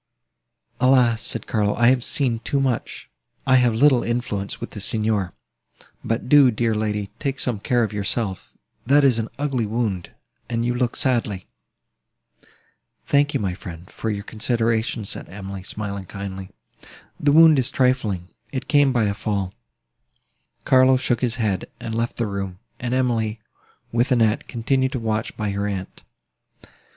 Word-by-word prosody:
"Alas!" 125 -3 +4
said - - -2
Carlo, 105 -2 0
"I 120 0 +5
have 125 -2 +2
seen 125 -5 0
too 140 +4 -1
much! 130 -4 -2 0.4
I 130 -1 +5
have 120 -3 +3
little 130 0 +5
influence 115 -4 -2
with - - -6
the 105 - -7
Signor. 105 -2 -1 0.7
But 115 +2 -2
do, 140 -1 +7
dear 115 0 0
young 110 0 0
lady, 105 -2 -2
take 140 -2 -2
some 120 -5 -1
care 120 +3 +1
of 105 -1 -2
yourself; 100 -1 -2 0.3
that 140 +4 +4
is 130 -4 +4
an 110 - -2
ugly 135 -6 -1
wound, 105 -5 -2 0.4
and 115 -1 -1
you 120 - +1
look 125 -1 -1
sadly." 115 -8 0 1.6
"Thank 145 0 +2
you, - - +2
my 95 -4 -1
friend, 90 -2 -10
for 110 - -4
your 100 -1 -3
consideration," 115 0 -1
said - - -6
Emily, 95 0 -7
smiling 100 -1 -5
kindly: 95 -1 -6 0.7
"the 145 - +3
wound 160 -1 +7
is 130 0 +1
trifling, 115 -10 0 0.2
it 130 - -4
came 145 -2 +4
by 120 -3 +2
a 100 -1 +1
fall." 100 -3 -2 1.1
Carlo 130 0 +5
shook 120 -2 0
his 125 -2 0
head, 105 -6 -1
and 115 -1 -5
left 115 +1 -2
the 120 - 0
room; 100 -3 -4 0.2
and 125 +1 -2
Emily, 115 -4 0 0.5
with 120 +3 +1
Annette, 115 -3 +2
continued 130 +3 0
to 130 - -1
watch 110 -1 -2
by 105 -2 -1
her 100 +1 -2
aunt. 95 -2 -5
115 Hz, 160 wpm, -22 LUFS, 105-125 Hz, 1.6 s, do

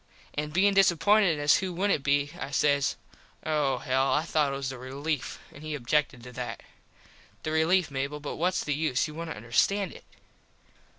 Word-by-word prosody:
An 150 +1 -3
bein 190 +6 +3
disappointed 195 -1 +4
as 145 0 +4
who 190 -1 -3
wouldnt 195 -4 +1
be 145 0 +1
I 135 - -4
says 140 0 +2 0.5
Oh 150 -4 +1
hell. 130 +2 +1
I 150 - +2
thought 155 -4 +1
it - - -3
was 135 -1 -3
the 130 -2 -7
relief. 140 +3 -3 0.2
An 145 - -12
he 155 -1 -4
objected 140 -1 0
to 125 - -9
that. 125 0 -6 0.8
The 155 - -2
relief, 160 +1 +2
Mable 140 +2 -3
but 145 - -6
whats 180 +3 0
the 150 - -1
use 150 -1 0
you 150 - -9
wouldnt 165 -3 -6
understand 170 - +1
it. - - -13
150 Hz, 180 wpm, -28 LUFS, 135-165 Hz, 0.8 s, disappointed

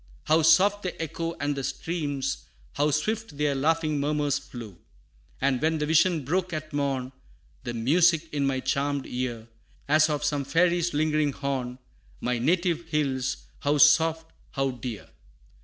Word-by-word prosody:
How 160 +1 +3
soft 190 +6 +5
the 185 - -5
echo, 165 +1 -3
and 145 0 -1
the 135 - -4
streams, 145 -4 -3 0.3
How 145 +1 +1
swift 185 +3 -2
their 150 -1 +1
laughing 155 +2 +1
murmurs 145 0 0
flew! 115 -9 -10 0.6
And 135 -2 +1
when 160 +1 +1
the 150 - -1
vision 160 -1 +3
broke 180 +4 -1
at 155 -1 -5
morn, 135 -3 -1 0.5
The 120 -1 -4
music 165 +7 +3
in 140 -2 +1
my 130 -1 -1
charmed 140 0 -1
ear, 120 -3 -4 0.4
As 155 +2 +4
of 150 -1 -1
some 145 -1 0
fairy's 175 +2 +1
lingering 155 -1 +1
horn, 130 -3 -3 0.4
My 125 -1 -1
native 170 +4 +1
hills, 135 -4 -1
how 145 +1 +1
soft, 160 +2 +4 0.2
how 135 -1 0
dear! 120 -3 -7
150 Hz, 150 wpm, -26 LUFS, 135-165 Hz, 0.6 s, soft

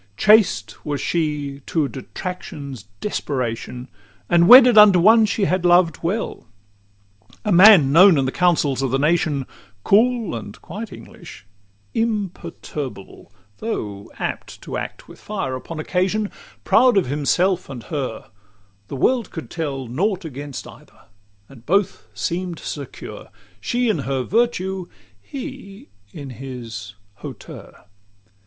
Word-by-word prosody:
XIV 100 +1 -37
Chaste 195 - +3
was 145 -2 -3
she, 150 -3 -2
to 155 -4 0
detraction's 140 - -7 0.2
desperation, 125 - -4 0.4
And 170 0 +4
wedded 250 0 +9
unto 210 -3 +8
one 220 +4 +6
she 205 -1 0
had 185 -1 0
loved 175 -2 +4
well 180 - -3 1.0
A 210 - 0
man 180 -6 +7
known 180 +2 +7
in 135 - +1
the 130 - -1
councils 155 -7 +1
of 135 - 0
the 135 - +1
nation, 150 -2 +1 0.4
Cool, 230 0 +2
and 105 -2 -8
quite 210 +5 -8
English, 95 - -12 0.5
imperturbable, 170 - -5 0.3
Though 105 - -5
apt - - -5
to - - -6
act - - -6
with - - -14
fire 190 -11 -4
upon 155 +5 -7
occasion, 190 +6 -1 0.3
Proud 245 -2 +4
of 195 - +3
himself 170 +7 0
and 125 -4 -8
her: 135 -8 -5 0.6
the - - -6
world 235 - +1
could 160 - -8
tell 140 -5 -4
Nought 185 - -1
against 145 -2 -7
either, - - -17 0.4
and 125 -4 -16
both 195 +8 0
seem'd 175 0 -3
secure 140 -3 -8 0.3
She 245 0 -1
in 215 -8 +1
her 135 -1 -2
virtue, 190 - -1 0.3
he 260 - -9 0.2
in 140 -1 -8
his 115 -5 -8 0.2
hauteur. - - -11
165 Hz, 130 wpm, -21 LUFS, 135-200 Hz, 1.0 s, wedded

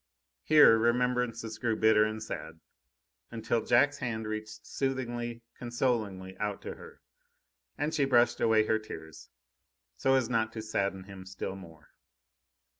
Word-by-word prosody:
Here 150 -7 +6
remembrances 120 -2 0
grew 115 -1 0
bitter 110 -1 +4
and 110 0 -4
sad, 80 -6 -7 0.7
until 115 0 -1
Jack's 140 +4 +3
hand 110 -4 -3
reached 110 0 -6
soothingly, 120 -3 -3
consolingly 110 -6 -2
out 105 -1 -2
to - - -5
her, 470 0 -14 0.8
and 150 +2 -1
she 140 - +2
brushed 120 -3 +3
away 110 -1 +4
her 110 0 +1
tears, 80 -7 -10 0.7
so 135 0 +3
as 130 -3 +2
not 115 -2 0
to 110 - -5
sadden 100 -3 -2
him 95 -1 -11
still 95 0 -5
more. 80 -5 -14
110 Hz, 135 wpm, -30 LUFS, 105-120 Hz, 0.8 s, Here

